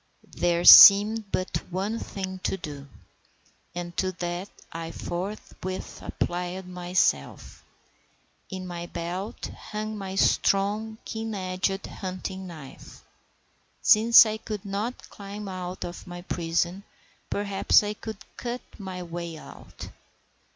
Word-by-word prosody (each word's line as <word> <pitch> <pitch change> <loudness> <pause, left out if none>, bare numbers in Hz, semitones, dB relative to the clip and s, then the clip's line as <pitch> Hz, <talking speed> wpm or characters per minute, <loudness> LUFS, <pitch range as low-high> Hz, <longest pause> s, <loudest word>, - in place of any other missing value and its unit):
There 175 0 +1
seemed 205 +1 +10
but 185 - -1
one 195 +5 -2
thing 190 -1 -6
to 190 - -2
do, 145 -5 -8 0.9
and 175 -1 -5
to 185 0 +1
that 175 +2 -4 0.2
I 165 0 -5
forthwith 185 +1 -6
applied 180 +1 -3
myself. 180 - -1 0.9
In 185 -1 -6
my 175 -1 -6
belt 175 +5 -5
hung 215 0 -5
my 195 -2 -6
strong, 205 +3 +1
keen 220 -1 -4
edged 185 +1 -2
hunting 190 0 -6
knife. 155 -6 -12 0.8
Since 230 +2 +8
I 215 0 -2
could 215 -2 -6
not 205 +5 -4
climb 205 0 -8
out 185 -1 -5
of 175 +2 -8
my 175 0 -8
prison, 175 +2 -1 0.5
perhaps 200 0 +3
I 205 0 -2
could 220 0 -8 0.2
cut 245 +1 -4 0.2
my 185 -2 -6
way 170 -1 -6
out. - - -11
185 Hz, 115 wpm, -26 LUFS, 175-205 Hz, 0.9 s, seemed